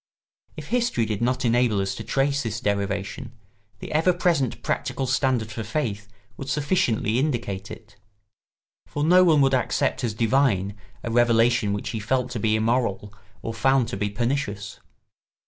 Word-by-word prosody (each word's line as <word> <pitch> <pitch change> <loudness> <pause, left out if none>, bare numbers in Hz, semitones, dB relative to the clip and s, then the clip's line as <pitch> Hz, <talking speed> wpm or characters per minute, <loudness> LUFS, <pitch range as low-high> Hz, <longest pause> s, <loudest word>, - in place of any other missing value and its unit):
If - - -8
history 235 - +1
did 105 -1 -3
not 125 +1 0
enable 120 -3 +2
us 95 0 -1
to - - -7
trace 140 +1 0
this 115 -5 -3
derivation, 100 +4 -2 0.4
the - - -8
ever 165 +4 +3
present 170 -8 0
practical 135 - -2
standard 130 -4 0
for 110 +1 -5
faith 105 -3 -3 0.3
would 135 - -6
sufficiently 130 -6 +1
indicate 115 -9 -2
it; 105 -2 -12 0.9
for 145 - -3
no 180 +4 +6
one 160 -5 +5
would 135 0 +3
accept 130 0 0
as 110 -3 -1
divine 110 -4 +1 0.3
a 115 - -3
revelation 115 -2 +3
which 100 0 -3
he 110 - -3
felt 125 +3 -1
to 120 - -3
be 110 +1 +2
immoral 110 -3 0 0.3
or 115 - -3
found 130 +1 +2
to - - -4
be 105 +1 -1
pernicious. 105 -3 -3
120 Hz, 160 wpm, -24 LUFS, 105-135 Hz, 0.9 s, no